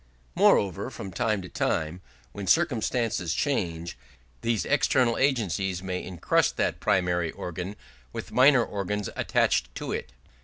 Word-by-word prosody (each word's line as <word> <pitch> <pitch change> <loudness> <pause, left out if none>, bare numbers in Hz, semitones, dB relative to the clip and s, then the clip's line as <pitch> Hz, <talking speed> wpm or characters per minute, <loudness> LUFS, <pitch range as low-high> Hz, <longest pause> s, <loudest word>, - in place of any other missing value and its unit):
Moreover, 95 +6 +3
from 95 - -7
time 110 -5 0
to - - -7
time, 80 0 -1 0.3
when 95 +8 -7
circumstances 115 - +1
change, 85 - -1 0.5
these 115 -2 0
external 130 -4 +3
agencies 95 - 0
may 90 -1 -3
encrust 90 -3 +1
that - - 0
primary 90 -2 +1
organ 90 +4 -6 0.4
with - - -7
minor 130 -2 +5
organs 105 0 -3
attached - - +1
to - - -4
it. 65 - -4
95 Hz, 125 wpm, -27 LUFS, 90-115 Hz, 0.5 s, minor